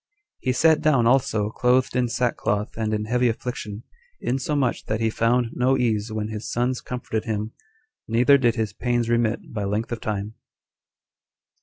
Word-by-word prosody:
He 130 - 0
sat 160 +5 +4
down 135 -6 +3
also 115 -4 +2
clothed 125 +2 +2
in 125 -1 +2
sackcloth 115 -3 -1
and 110 -1 -2
in 105 0 -1
heavy 125 +2 +2
affliction, 115 -2 -5 0.4
insomuch 135 0 -1
that 110 0 -2
he 115 -1 +1
found 115 +1 +1
no 130 +2 +2
ease 110 -3 0
when 110 0 -3
his 110 0 -5
sons 125 +1 0
comforted 115 -3 -4
him, 110 -1 -2 0.6
neither 125 +5 +5
did 120 -3 +2
his 110 -4 -2
pains 120 0 -1
remit 115 -1 0
by 105 -2 -2
length 105 +4 -2
of 115 -1 -4
time. 105 0 -3
115 Hz, 160 wpm, -24 LUFS, 110-125 Hz, 0.6 s, neither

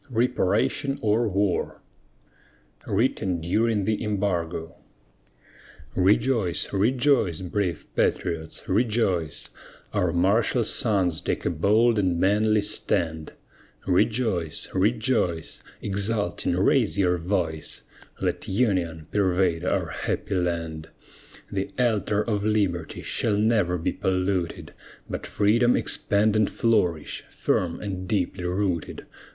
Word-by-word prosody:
REPARATION 125 +3 +1
OR 110 +2 +2
WAR 100 -1 0 1.1
WRITTEN 100 -4 0
DURING 105 +5 +1
THE 110 +1 -1
EMBARGO 90 -6 -2 1.2
Rejoice, 100 0 +1
rejoice, 115 - +2
brave 90 -2 -2
patriots, 80 -1 -1
rejoice! 100 - 0 0.4
Our 90 -2 +1
martial 100 +7 +2
sons 95 - +1
take - - -2
a - - +1
bold 105 +7 +3
and 90 -4 +1
manly 105 +2 +3
stand! 80 -5 -1 0.5
Rejoice, 95 - +1
rejoice, 105 -4 0 0.2
exulting 100 -1 0
raise 80 - +2
your 90 -2 +2
voice, 85 -3 -2 0.4
Let - - -2
union 95 -7 0
pervade 90 -4 +1
our 90 - 0
happy - - -3
land. 85 -3 -2 0.6
The 95 0 -2
altar 110 -4 +1
of 105 -3 -1
Liberty 100 -6 -1
shall 105 -2 0
never 105 -5 +2
be 80 - -1
polluted, 95 -2 -2 0.3
But - - -5
freedom 115 +4 +3
expand 105 +1 +2
and 110 -2 +3
flourish, 90 -9 0
firm 85 -2 -1
and 95 -3 -5
deeply 90 -3 -1
rooted. 90 -2 -2
100 Hz, 100 wpm, -25 LUFS, 85-110 Hz, 1.2 s, bold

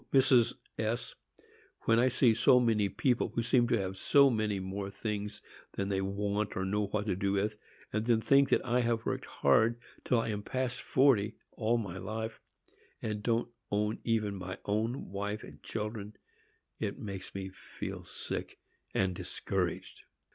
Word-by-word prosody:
Mrs. 125 -3 +5 0.2
S——, 110 +2 -1 0.7
when 115 0 +3
I 125 - +5
see 125 -2 +4
so 125 +3 +6
many 110 -4 +2
people 125 +4 +1
who 115 - +1
seem 120 +1 +3
to 120 - +3
have 95 -1 -3
so 140 +6 +5
many 110 -3 0
more 95 +1 -4
things 105 0 -4 0.3
than 100 0 -2
they 95 -1 +1
want 100 +1 -1
or 95 - 0
know 105 +1 0
what 105 +1 -1
to 105 - 0
do 100 +1 0
with, 105 +2 0 0.4
and 110 +2 -1
then 115 -2 +4
think 140 +4 +4
that - - +2
I 125 0 +2
have 115 -2 0
worked - - -2
hard, 115 +1 +3 0.2
till 125 - +2
I 115 - -1
am 105 -1 -2
past 130 +3 -2
forty, 115 -6 +3 0.2
all 115 +1 +1
my 95 -5 -4
life, 110 +3 -4 0.6
and 105 -1 -3
don't 115 +2 +1 0.2
own 105 +1 0
even 110 -3 +1
my 95 -1 -5
own 110 +3 -1
wife 105 +2 -3
and - - -12
children, 105 -1 -5 0.6
it - - -2
makes 95 -3 -7
me 95 -1 -4
feel 95 - -7
sick - - -5 0.4
and 95 -1 +2
discouraged! - - -3
110 Hz, 170 wpm, -32 LUFS, 100-115 Hz, 0.7 s, so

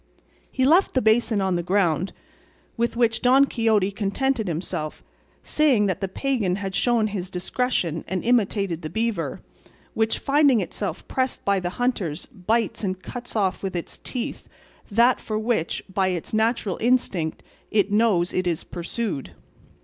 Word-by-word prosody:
He 260 - +1
left 335 +6 +4
the - - +5
basin 220 -1 +3
on 190 -2 +1
the 175 - 0
ground, 180 -1 +1 0.6
with 235 0 -1
which 230 -2 +2
Don 265 +3 +6
Quixote 220 -6 +1
contented 220 +4 -1
himself, 155 -2 -4 0.4
saying 275 -9 +3
that 190 -1 -1
the 195 - 0
pagan 210 -3 0
had 195 -1 -4
shown 235 +1 +2
his 195 -4 -3
discretion 180 -3 -1
and 185 +1 -2
imitated 200 -7 +1
the 155 - -5
beaver, 220 -5 -2 0.5
which 220 0 +1
finding 280 -3 +4
itself - - -4
pressed 260 0 -2
by 200 -1 +3
the 175 -1 -2
hunters 200 - -1
bites 225 0 -1
and 185 -1 -2
cuts 245 -1 -7
off 195 -4 +1
with 190 -2 -4
its 170 - -5
teeth 250 -3 -5 0.4
that 235 +4 +4
for 215 - -3
which, 215 -6 -1
by 190 0 0
its 180 0 -3
natural 220 -3 +1
instinct, 215 -10 +1 0.3
it 205 -2 +2
knows 205 -5 +3
it 185 0 0
is 170 -1 -1
pursued. 175 - -4
210 Hz, 155 wpm, -24 LUFS, 185-235 Hz, 0.6 s, Don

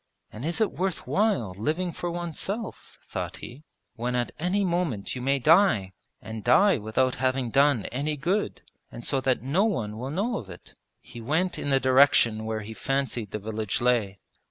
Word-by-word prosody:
'And 110 - -7
is 170 +5 -1
it 220 - +2
worth 185 -1 -2
while 190 - +1
living 165 - -1
for 175 +2 -4
oneself,' 175 +6 -5
thought - - -5
he, 135 +6 -10 0.3
'when 125 +2 -3
at 120 -1 -1
any 190 +4 +1
moment 170 - -1
you 125 - -5
may 135 +2 +2
die, 135 - +4 0.3
and 110 -1 -7
die 195 +8 +5
without 115 +5 +1
having 130 -2 0
done 140 -5 +3
any 150 +4 -2
good, 185 +9 -1 0.3
and 120 - -8
so 135 -2 +1
that 130 -3 0
no 150 +10 +2
one 110 - -2
will 130 +2 -4
know 200 - -1
of 100 - -11
it?' 85 - -12 0.3
He 120 - -11
went 160 +9 0
in 145 - -3
the 135 -1 +4
direction 130 -4 +4
where 110 0 -2
he 105 +2 -8
fancied 135 -4 -2
the - - -4
village 105 -1 -3
lay. 120 -5 +1
135 Hz, 180 wpm, -26 LUFS, 115-170 Hz, 0.3 s, die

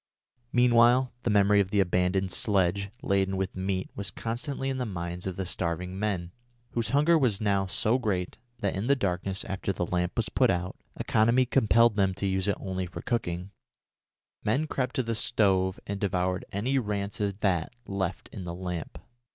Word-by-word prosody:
Meanwhile 120 +1 +5
the 120 - -1
memory 105 0 +5
of 95 -2 +2
the 100 0 +1
abandoned 90 +1 +1
sledge 100 -1 +1
laden 95 -4 +1
with 95 -1 -2
meat 95 0 -2
was 100 -2 -1
constantly 135 - -4
in 135 -1 -1
the 125 - -1
minds 90 -2 -4
of 95 - -3
the 95 - -3
starving 90 +1 -2
men, 95 -5 -1 0.4
whose 115 -1 -1
hunger 155 +4 +4
was 115 -8 +2
now 100 -3 +1
so 110 +6 +1
great 95 -7 -2 0.2
that 100 - 0
in 100 +5 -2
the 140 - +5
darkness 95 -4 -2
after 95 0 -2
the 90 -2 -2
lamp 90 0 -1
was 115 -1 +1
put 125 +1 +3
out 90 -1 -1 0.2
economy 115 +4 +3
compelled 115 -3 +4
them 95 -2 +2
to 100 - -3
use 95 0 0
it 100 - +1
only 95 -1 -3
for 85 - -8
cooking 90 -6 -2 0.9
men 130 +9 +1
crept 130 -4 -2
to 130 - +1
the 115 0 -2
stove 95 -4 +2
and 100 0 -4
devoured 90 -2 0
any 125 +7 0
rancid 100 -2 -2
fat 90 -6 +1
left 95 -2 -3
in 100 - -7
the 85 -1 -5
lamp. 90 -2 -5
100 Hz, 180 wpm, -28 LUFS, 95-115 Hz, 0.9 s, Meanwhile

